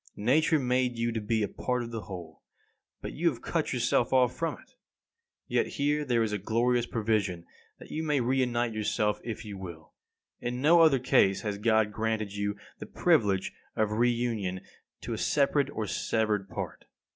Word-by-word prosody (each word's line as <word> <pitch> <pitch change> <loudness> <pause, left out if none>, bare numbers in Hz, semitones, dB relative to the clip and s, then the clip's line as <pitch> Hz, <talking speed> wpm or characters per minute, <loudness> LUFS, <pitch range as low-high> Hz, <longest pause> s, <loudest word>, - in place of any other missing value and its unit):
Nature 150 +9 +3
made 125 -2 0
you 115 0 0
to 115 -1 -3
be 110 +1 0
a - - 0
part 125 +4 -2
of 115 - -7
the 115 -1 -4
whole, 85 -5 -9 0.6
but - - -5
you 170 +2 +2
have 125 -7 -7
cut 165 -3 -1
yourself 120 -1 +1
off 125 -2 +3
from 165 -1 -2
it. - - -20 0.7
Yet - - +1
here 145 +1 +1
there 120 -4 +2
is 110 - -1
the 105 - -1
glorious 120 +4 +1
provision 105 -6 -1 0.3
that - - -13
you 155 - -2
may 150 -3 +1
re 130 +2 +1
unite 120 -2 0
yourself 105 0 0
if 115 0 -5
you 100 -2 -7
will. 85 -4 -9 0.5
In 125 +1 -3
no 165 +5 +6
other 155 -4 +6
case 100 -6 +3
has 105 -2 -3
God 110 -1 +3
granted 110 -1 -2 0.5
the - - -7
privilege 95 -2 +2 0.2
of 110 -1 +1
re 120 +3 +3
union 110 -6 -2 0.4
to - - -4
a - - -4
separated 140 -1 +2
or 110 - -2
severed 105 -1 -1
part. - - -6
115 Hz, 180 wpm, -29 LUFS, 105-125 Hz, 0.7 s, no